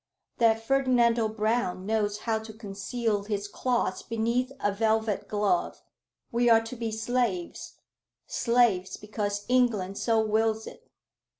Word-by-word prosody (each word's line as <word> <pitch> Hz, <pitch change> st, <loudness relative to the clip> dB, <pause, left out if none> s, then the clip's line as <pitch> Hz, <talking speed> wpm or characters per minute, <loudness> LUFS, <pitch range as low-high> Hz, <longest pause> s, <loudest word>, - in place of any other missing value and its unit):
That 225 Hz, -1 st, +3 dB
Ferdinando 245 Hz, -3 st, +3 dB
Brown 215 Hz, -4 st, -1 dB
knows 210 Hz, -1 st, 0 dB
how 225 Hz, -2 st, 0 dB
to 220 Hz, 0 st, -10 dB
conceal 210 Hz, 0 st, -3 dB
his 205 Hz, -1 st, -2 dB
claws 240 Hz, -3 st, -1 dB
beneath 235 Hz, +3 st, -1 dB
a 205 Hz, -, +1 dB
velvet 220 Hz, 0 st, 0 dB
glove. 205 Hz, -4 st, 0 dB, 0.5 s
We 240 Hz, +1 st, +2 dB
are 225 Hz, -1 st, +6 dB
to 225 Hz, +2 st, -7 dB
be 230 Hz, -2 st, -3 dB
slaves, 220 Hz, -5 st, -2 dB, 0.5 s
slaves 235 Hz, -6 st, +1 dB
because 205 Hz, -1 st, -3 dB
England 225 Hz, -7 st, +1 dB
so 225 Hz, -2 st, +2 dB
wills 220 Hz, 0 st, +1 dB
it. -, -, -12 dB
220 Hz, 125 wpm, -27 LUFS, 205-235 Hz, 0.5 s, are